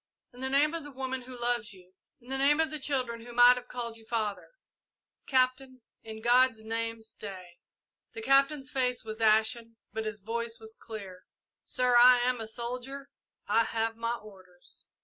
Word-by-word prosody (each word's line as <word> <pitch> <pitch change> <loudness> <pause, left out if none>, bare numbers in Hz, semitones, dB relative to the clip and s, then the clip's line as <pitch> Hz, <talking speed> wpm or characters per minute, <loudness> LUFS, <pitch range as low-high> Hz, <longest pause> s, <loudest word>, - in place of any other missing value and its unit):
In 245 - -14
the 265 0 -2
name 290 +3 +3
of 335 -2 -4
the 290 - -8
woman 260 -1 -4
who 250 0 -11
loves 240 -3 0
you 185 -1 -18 0.3
in 245 - -18
the 270 - -2
name 290 +3 +4
of 320 -1 +1
the 305 - -5
children 255 -5 -2
who 240 0 -10
might 245 +1 +8
have 250 0 -8
called 235 -2 -4
you 225 - -16
father 215 -4 -2 0.8
Captain 255 0 +1 0.2
in 220 0 -9
God's 240 -2 +4
name 225 0 -3
stay!" 185 -5 -10 0.6
The 440 - -6
Captain's 275 -3 +3
face 250 -2 0
was 220 0 -7
ashen, 225 +1 +2 0.2
but 220 -1 -3
his 215 -1 -5
voice 230 +2 -3
was 220 0 -11
clear. 195 -5 -9 0.4
"Sir, 250 -1 +1
I 250 +1 +8
am 250 -1 0
a 220 - -5
soldier 250 +4 -5 0.4
I 230 - +4
have 225 0 -1
my 230 +1 -2
orders!" 185 -5 -16
235 Hz, 180 wpm, -29 LUFS, 220-255 Hz, 0.8 s, might